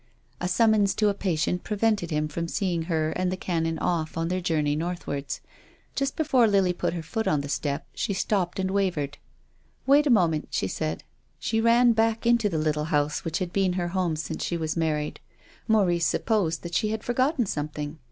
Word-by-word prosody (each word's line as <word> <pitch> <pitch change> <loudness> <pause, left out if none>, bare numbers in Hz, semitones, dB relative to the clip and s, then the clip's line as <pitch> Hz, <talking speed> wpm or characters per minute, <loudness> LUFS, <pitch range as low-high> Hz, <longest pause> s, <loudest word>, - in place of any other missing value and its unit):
A 180 - -1
summons 210 +1 +3
to 210 -1 +3
a - - +1
patient 180 -3 -1
prevented 210 -4 0
him 150 -1 0
from 165 +3 -4
seeing 180 -2 -1
her 160 -2 0
and 180 +2 -1
the 185 - -2
Canon 165 -3 -1
off 160 -1 -1
on 165 +1 -1
their 185 +1 -1
journey 150 -4 +1
northwards. 160 -4 -4 0.5
Just 275 0 -1
before 265 -7 +3
Lily 195 -3 +3
put 175 - -2
her 165 - -4
foot 220 +8 -3
on 150 -2 +2
the 140 - -6
step 145 0 -2
she - - -2
stopped 190 -2 0
and 190 0 -1
wavered. 175 -8 -1 0.3
" 75 0 -39
Wait 285 +3 +5
a - - +2
moment," 170 - +3
she 95 - -1
said. 80 -3 -3 0.3
She 225 0 0
ran 235 +1 +5
back 225 0 +1
into 235 -3 +3
the 165 - -2
little 150 -1 0
house 150 0 0
which 165 -2 -2
had 185 -3 -3
been 190 -2 +2
her 175 -1 -1
home 180 -3 0
since 155 - -4
she 170 - -1
was 160 -1 -2
married. 155 -2 -1 0.5
Maurice 185 -7 +3
supposed 185 -8 0
that 170 0 -7
she 215 - +1
had 220 0 -3
forgotten 255 +2 +1
something. 150 -2 -4
175 Hz, 200 wpm, -26 LUFS, 155-210 Hz, 0.5 s, Wait